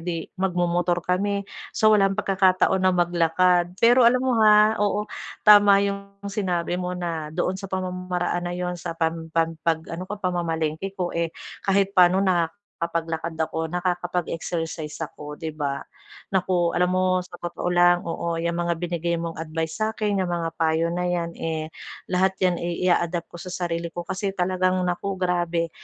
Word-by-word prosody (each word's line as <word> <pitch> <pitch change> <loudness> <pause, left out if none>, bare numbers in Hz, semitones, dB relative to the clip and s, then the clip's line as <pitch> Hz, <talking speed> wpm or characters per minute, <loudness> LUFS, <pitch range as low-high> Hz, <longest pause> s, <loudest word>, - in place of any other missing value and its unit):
'di 165 -1 -5
magmomotor 175 -1 +1
kami, 200 +2 0 0.2
so, 215 0 +3
walang 195 -2 +3
pagkakataon 190 -1 +2
na 185 0 +3
maglakad. 175 +1 +2
Pero 240 +2 +6
alam 255 +2 +1
mo, 245 -4 +2
ha, 215 0 +6
oo, 205 0 +1 0.4
tama 205 -1 +7
yung 200 0 -4 0.2
sinabi 180 -3 -1
mo 180 0 -3
na 165 -3 -3
doon 175 +3 -1
sa 195 - -7
pamamaraan 180 -1 -2
na 175 - -4
yun, 180 0 -2
sa 165 - -5
pam 160 0 -1
pam 165 0 +1
pag 160 -1 0
ano 185 +2 -6
ko 210 - -4
pamamalengke 175 0 -2
ko, 180 -2 -2
eh, 170 0 0 0.3
kahit 195 0 +1
paano 185 +1 +5
nakakapaglakad 170 -2 -2
ako, 160 0 -1
nakakapag-exercise 175 -3 -3
ako, 150 0 -9
'di 160 -2 -4
ba? 140 -2 -3 0.5
Naku, 180 -2 +1
alam 180 0 +2
mo 185 0 +2 0.2
sa 175 - -12
totoo 175 0 -3
lang 175 0 +4
oo 170 0 -2
'yang 170 +1 -1
mga 170 0 0
binigay 170 0 -2
mong 165 -1 -5
advice 160 +1 -3
sa'kin, 215 -2 0
yang 185 - -1
mga 170 -1 -1
payo 160 +1 +2
na 180 +1 -1
yan, 170 -1 -1
eh, 160 -1 -3 0.4
lahat 190 +1 +2
yan, 180 -2 +2
eh, 175 +1 -3
i-a-adapt 175 -1 +1
ko 175 - -9
sa 185 - -7 0.2
sarili 170 0 -2
ko 175 - -3
kasi 190 +3 -3
talagang 185 0 +1
naku 180 +2 -2
grabe, 175 -2 0
175 Hz, 165 wpm, -24 LUFS, 170-190 Hz, 0.5 s, tama